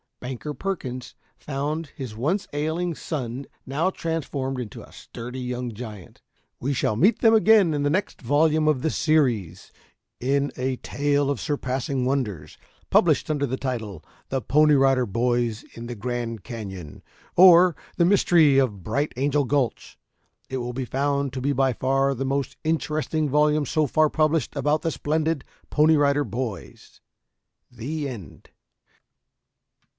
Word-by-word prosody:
Banker 130 +4 -5
Perkins 130 -7 -5 0.2
found 150 +3 -3
his 125 -6 -6
once 180 - -1
ailing 160 +3 -1
son 135 -4 -4 0.2
now 150 +7 +1
transformed 145 -7 -3
into 115 -5 -7
a - - -16
sturdy 125 +2 -8
young 125 -1 -4
giant. 105 -5 -10 0.4
We 140 +3 -1
shall 110 -4 0
meet 195 - +3
them 225 -2 +5
again 215 -6 +5
in 145 -1 -1
the 145 - +2
next 185 +7 -2
volume 155 +4 +2
of 150 -4 +2
this 160 - -1
series 120 - +1 0.5
in 140 +3 0
a 130 0 -1
tale 145 +2 0
of 140 -5 -1
surpassing 135 -2 -2
wonders 105 - -2 0.3
published - - +3
under 145 -2 0
the 130 0 -3
title: 110 - -4 0.3
"THE 135 -1 -1
PONY 150 +6 +4
RIDER 135 -2 +3
BOYS 120 +1 0
IN 115 0 -8
THE 120 - -5
GRAND 115 -1 -4
CANYON; 95 - -8 0.3
Or, 180 -1 +7 0.2
the 170 - +4
Mystery 170 -7 +5
of 105 -9 -1
Bright 145 - -1
Angel 145 +2 +1
Gulch." 135 -2 -2 0.5
It 130 - -3
will 125 -1 -4
be 130 +1 -3
found 140 +1 -1
to 130 - -4
be 140 +2 +1
by 135 -1 +2
far 135 +3 +1
the 135 +2 -3
most 135 +1 -2
interesting 155 -1 -1
volume 150 +1 +3
so 155 +3 +1
far 155 +3 +3
published 155 -4 +1
about 150 +1 +1
the 165 - 0
splendid 155 0 -1 0.3
Pony 155 +1 +4
Rider 145 0 +3
Boys. 105 - -6 0.7
The 140 +6 -4
End. 105 - -10
135 Hz, 150 wpm, -24 LUFS, 125-155 Hz, 0.7 s, Or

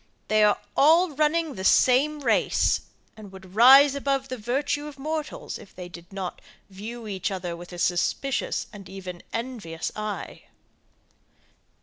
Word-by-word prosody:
They 215 0 +4
are 210 -1 +4 0.2
all 325 +5 +5
running 305 +1 +1
the 190 - -7
same 280 +8 +4
race, - - +2 0.3
and 210 -3 -12
would 190 -1 -13
rise 265 +6 +8
above 275 -1 -1
the 255 - -4
virtue 280 +6 -1
of 290 -2 -10
mortals 310 - -4
if 200 - -15
they 180 -1 -8
did 170 +1 -13
not 190 -2 -5 0.3
view 220 +4 -8
each 195 0 -2
other 180 -3 -4
with 175 +1 -11
a 175 - -8
suspicious 180 +10 0
and 195 -3 -11
even 185 -2 -8
envious 225 -10 -4
eye. 215 -1 -6
225 Hz, 145 wpm, -25 LUFS, 190-280 Hz, 0.3 s, rise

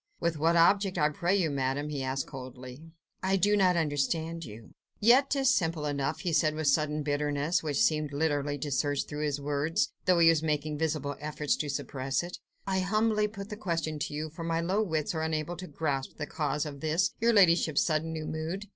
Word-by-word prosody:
"With 165 -3 -1
what 165 +2 +3
object, 190 +3 +4
I 150 -2 +3
pray 175 +5 0
you, 165 -6 +1
Madame?" 140 +2 -1
he 145 -2 -3
asked 130 +1 -2
coldly. 130 0 -9 0.4
"I 190 +1 +2
do 205 +3 +3
not 185 -3 +3
understand 160 +2 -1
you." 110 -4 -11 0.3
"Yet 250 +6 +5
'tis 275 -1 +3
simple 165 - 0
enough," 140 -2 -2
he 175 - -2
said 155 0 +2
with 155 0 -3
sudden 150 +1 +1
bitterness, 145 +2 0
which 150 -3 -2
seemed 155 -7 +1
literally 145 -1 0
to 145 +1 -4
surge 145 +1 0
through 150 0 -4
his 145 -1 -1
words, 145 +3 0
though 185 -1 +4
he 165 -1 +6
was 165 -2 +3
making 150 -1 -1
visible 150 -3 -1
efforts 150 0 -1
to 150 - -3
suppress 135 +1 -2
it, 175 +1 -7 0.3
"I 190 -1 0
humbly 215 +2 +1
put 200 -1 -8
the 210 - -5
question 165 -6 -2
to 145 - -3
you, 155 +1 -4
for 165 +2 -7
my 165 0 0
slow 190 +5 +1
wits 160 -7 -1
are 160 - -2
unable 160 +1 -2
to 185 - -7
grasp 140 -3 -3
the 150 - -3
cause 150 0 -2
of 145 -2 -7
this, 160 +5 +1
your 235 +1 +3
ladyship's 170 -7 +4
sudden 160 0 0
new 160 -1 -4
mood. 160 +6 -4
155 Hz, 210 wpm, -29 LUFS, 145-175 Hz, 0.4 s, he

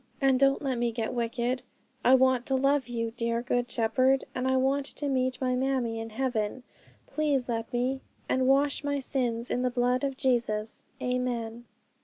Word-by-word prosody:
And 270 -2 +3
don't 275 +1 +3
let 260 -3 -1
me 240 -1 +1
get 225 -1 -3
wicked; 240 +1 -1 0.4
I 255 - +7
want 260 -1 +3
to 270 - +1
love 275 0 +2
you, 230 -2 -2
dear 235 0 -1
Good 245 -1 0
Shepherd, 255 +4 +2
and 255 +1 -1
I 260 0 +3
want 270 +2 +1
to 290 - -4
meet 255 -2 0
my 255 -1 0
mammie 250 -3 0
in 225 0 -5
heaven: 245 0 -2 0.4
please 290 -5 0
let 230 -1 -3
me; 255 +2 -1 0.3
and 255 0 +1
wish 280 +2 +3
my 285 0 0
sins 245 -3 -1
in 250 - 0
the 250 - +1
blood 250 +2 +1
of 275 -2 -1
Jesus. 230 -5 0 0.2
Amen.' 240 -2 -2
255 Hz, 180 wpm, -28 LUFS, 235-265 Hz, 0.4 s, I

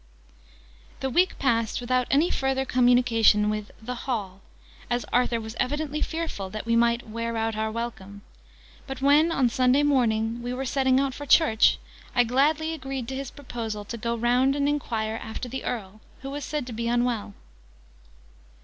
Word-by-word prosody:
The 265 - -1
week 360 +8 +2
passed 230 -5 0
without 250 0 0
any 300 +6 +3
further 265 0 0
communication 245 -4 +4
with 210 -1 -4
the 245 +3 -5
'Hall,' 210 -7 -4 0.5
as 240 +1 -1
Arthur 245 -1 +2
was 220 0 -7
evidently 295 +3 -1
fearful 320 - -3
that 215 +3 -6
we 230 0 +1
might 235 0 +2
'wear 230 +1 -3
out 225 0 -1
our 220 0 -1
welcome'; 205 -3 -6 0.6
but 270 -1 -6
when, 295 +4 +5
on 270 -6 +2
Sunday 255 +4 +3
morning, 235 -5 +1
we 245 +1 -4
were 265 +1 -3
setting 265 0 +2
out 275 -1 0
for 290 +2 -8
church, 270 -10 +5 0.4
I 245 - +5
gladly 295 +6 +1
agreed 270 -5 -5
to 265 - -4
his 270 -1 -4
proposal 225 -6 -6
to 235 - -6
go 235 +1 -2
round 245 +4 +2
and 285 0 +1
enquire 225 -7 -1
after 220 +3 -6
the 265 +2 -5
Earl, 215 -3 -5 0.2
who 270 - -5
was 290 +1 -5
said 300 -3 -3
to 245 - -7
be 230 +1 -3
unwell. 240 -4 0
245 Hz, 170 wpm, -26 LUFS, 225-270 Hz, 0.6 s, when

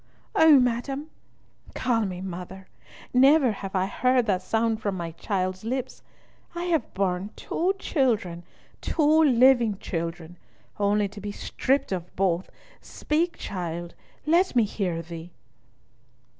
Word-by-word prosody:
"Oh, 310 -3 +7
madam—" 265 +5 -1 0.6
"Call 230 -3 +1
me 180 -1 -6
mother! 185 +1 -7 0.5
Never 265 0 +5
have 195 -1 -6
I 185 0 +2
heard 250 +4 +2
that 190 -4 +1
sound 225 +3 0
from 200 -3 -1
my 170 -1 -4
child's 185 +2 -3
lips. 255 +3 -4 0.5
I 345 - -3
have 335 -8 -1
borne 190 0 -1
two 370 +4 -1
children, 220 - 0 0.4
two 315 0 +3
living 245 -5 +4
children, 170 -1 -5 0.4
only 205 0 +2
to 205 +1 -11
be 205 +1 -4
stripped 265 +5 -1
of 180 -2 -4
both. 185 -1 0 0.3
Speak, 330 +3 -1
child—let 180 - -2
me 240 - +5
hear 185 -5 -2
thee." 165 0 -9
210 Hz, 125 wpm, -26 LUFS, 185-260 Hz, 0.6 s, Oh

